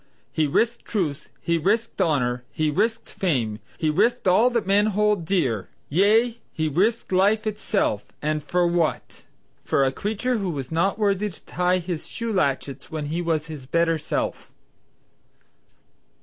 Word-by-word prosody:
"He 155 Hz, -2 st, +1 dB
risked 230 Hz, +11 st, +1 dB
truth, 165 Hz, -10 st, -2 dB
he 170 Hz, 0 st, +1 dB
risked 215 Hz, +5 st, 0 dB
honor, 125 Hz, -8 st, +1 dB
he 155 Hz, -2 st, 0 dB
risked 225 Hz, +9 st, 0 dB
fame, 120 Hz, -, -1 dB, 0.2 s
he 155 Hz, -1 st, +1 dB
risked 235 Hz, +8 st, +2 dB
all 215 Hz, +7 st, +5 dB
that 235 Hz, -4 st, -1 dB
men 200 Hz, +2 st, +3 dB
hold 210 Hz, -3 st, +1 dB
dear, 130 Hz, -, 0 dB, 0.2 s
yea, 220 Hz, -, +3 dB
he 155 Hz, 0 st, -1 dB
risked 200 Hz, +11 st, +1 dB
life 205 Hz, +4 st, +3 dB
itself, 210 Hz, -, -1 dB
and 155 Hz, 0 st, -1 dB
for 175 Hz, +4 st, +1 dB
what? 170 Hz, -2 st, -1 dB, 0.4 s
for 140 Hz, -, +2 dB
a 135 Hz, -, +2 dB
creature 220 Hz, -, -1 dB
who 195 Hz, -2 st, -2 dB
was 140 Hz, -5 st, -5 dB
not 170 Hz, +6 st, +1 dB
worthy 205 Hz, -1 st, +1 dB
to 185 Hz, -, -16 dB
tie 180 Hz, +1 st, +1 dB
his 175 Hz, -2 st, -4 dB
shoe 230 Hz, -2 st, -4 dB
latchets 140 Hz, -5 st, -1 dB
when 155 Hz, -2 st, -4 dB
he 170 Hz, -, 0 dB
was 160 Hz, -3 st, 0 dB
his 150 Hz, -5 st, -9 dB
better 165 Hz, +2 st, +2 dB
self." -, -, -3 dB
175 Hz, 155 wpm, -24 LUFS, 155-210 Hz, 0.4 s, all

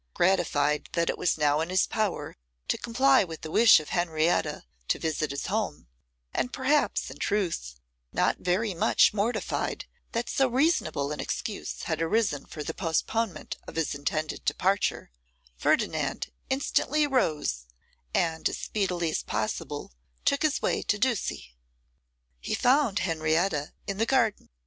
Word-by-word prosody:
Gratified 150 Hz, -5 st, +2 dB
that 170 Hz, -1 st, +2 dB
it -, -, -7 dB
was 180 Hz, -, +1 dB
now 150 Hz, -1 st, +3 dB
in 165 Hz, -, -2 dB
his 185 Hz, 0 st, +3 dB
power 215 Hz, -4 st, -2 dB, 0.3 s
to -, -, +3 dB
comply 260 Hz, +2 st, +3 dB
with 165 Hz, -3 st, -8 dB
the 155 Hz, -, -7 dB
wish 230 Hz, +4 st, +7 dB
of 155 Hz, -, -9 dB
Henrietta 170 Hz, -1 st, +1 dB, 0.2 s
to -, -, +1 dB
visit 155 Hz, -1 st, -1 dB
his 140 Hz, 0 st, -4 dB
home, -, -, -2 dB, 0.5 s
and 250 Hz, -, -1 dB
perhaps, 280 Hz, +3 st, +1 dB
in -, -, -11 dB
truth, 170 Hz, -, -1 dB, 0.4 s
not -, -, +1 dB
very 190 Hz, +4 st, 0 dB
much 170 Hz, -, +4 dB
mortified 215 Hz, +3 st, -1 dB, 0.3 s
that 235 Hz, +1 st, -1 dB
so 270 Hz, -, +2 dB
reasonable 240 Hz, -, +1 dB
an 150 Hz, -, -4 dB
excuse 210 Hz, -, -4 dB
had 160 Hz, -1 st, -2 dB
arisen 165 Hz, -4 st, +1 dB
for 155 Hz, -2 st, -6 dB
the 160 Hz, -, -4 dB
postponement 185 Hz, +3 st, -1 dB
of -, -, -9 dB
his 165 Hz, -2 st, 0 dB
intended 155 Hz, +2 st, -3 dB
departure, 190 Hz, -, 0 dB, 0.4 s
Ferdinand -, -, 0 dB, 0.2 s
instantly 285 Hz, +2 st, +1 dB
rose, 150 Hz, -, 0 dB, 0.4 s
and 160 Hz, -, +1 dB
as -, -, -4 dB
speedily 180 Hz, -5 st, -1 dB
as -, -, -1 dB
possible -, -, -3 dB, 0.3 s
took 280 Hz, -, +2 dB
his 310 Hz, -2 st, +1 dB
way -, -, +1 dB
to 210 Hz, -, 0 dB
Ducie. 210 Hz, -, -1 dB, 0.9 s
He -, -, -2 dB
found 255 Hz, -4 st, +3 dB
Henrietta 160 Hz, -2 st, 0 dB
in 200 Hz, 0 st, -4 dB
the 225 Hz, -, +2 dB
garden. 230 Hz, -6 st, +1 dB
180 Hz, 145 wpm, -28 LUFS, 155-230 Hz, 0.9 s, wish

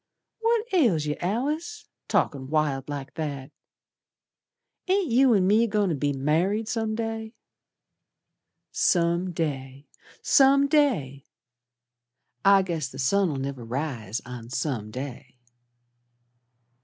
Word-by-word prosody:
"What 455 Hz, 0 st, +1 dB
ails 220 Hz, -, +3 dB
yer, 150 Hz, 0 st, -1 dB
Alice? 300 Hz, -, -2 dB, 0.2 s
Talkin' 135 Hz, -2 st, 0 dB
wild 150 Hz, -3 st, 0 dB
like 140 Hz, -2 st, -6 dB
that. 145 Hz, -4 st, -5 dB, 1.4 s
Ain't 375 Hz, -6 st, +1 dB
you 250 Hz, 0 st, +5 dB
an' 190 Hz, -2 st, +3 dB
me 215 Hz, +4 st, +4 dB
goin' 205 Hz, -2 st, +1 dB
to 165 Hz, -, 0 dB
be 145 Hz, +1 st, 0 dB
married 165 Hz, +11 st, 0 dB
Some 220 Hz, -2 st, -1 dB
day." 225 Hz, 0 st, -4 dB, 1.4 s
"Some 170 Hz, +1 st, +1 dB
day! 140 Hz, -4 st, -4 dB, 0.4 s
Some 275 Hz, 0 st, +5 dB
day! 225 Hz, -, +1 dB, 1.2 s
I 195 Hz, -1 st, +6 dB
guess 165 Hz, -7 st, -3 dB
the 135 Hz, -, -11 dB
sun'll 160 Hz, +5 st, +1 dB
never 135 Hz, -2 st, -4 dB
rise 115 Hz, -4 st, -4 dB
on 120 Hz, -2 st, -8 dB
some 125 Hz, -4 st, -3 dB
day." 130 Hz, +1 st, -8 dB
165 Hz, 110 wpm, -26 LUFS, 135-225 Hz, 1.4 s, I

